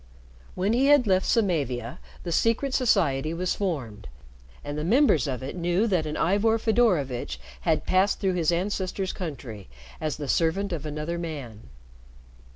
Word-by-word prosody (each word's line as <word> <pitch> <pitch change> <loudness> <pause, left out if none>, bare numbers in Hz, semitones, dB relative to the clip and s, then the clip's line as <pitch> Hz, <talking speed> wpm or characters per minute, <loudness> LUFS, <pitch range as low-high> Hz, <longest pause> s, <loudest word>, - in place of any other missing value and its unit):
When 195 +4 +1
he 260 +3 +3
had 290 -3 +6
left 190 -2 +2
Samavia, 140 - 0 0.2
the 175 - -4
secret 230 - +1
society 165 - +2
was 180 +1 -1
formed, 125 - -4 0.6
and 145 0 -5
the 150 - -3
members 190 - +3
of 130 -2 -3
it 135 - -5
knew 175 +4 +1
that 180 -8 0
an 150 - -3
Ivor 205 +5 +2
Fedorovitch 175 - +1 0.3
had - - +1
passed 190 +2 +2
through 190 -2 +1
his 175 -2 +1
ancestors' 190 +1 -2
country 130 - -7 0.3
as 155 -2 -2
the 145 -2 -5
servant 175 +6 +1
of 155 -2 -4
another 155 +3 -4
man. 140 - -7
170 Hz, 155 wpm, -26 LUFS, 145-200 Hz, 0.6 s, had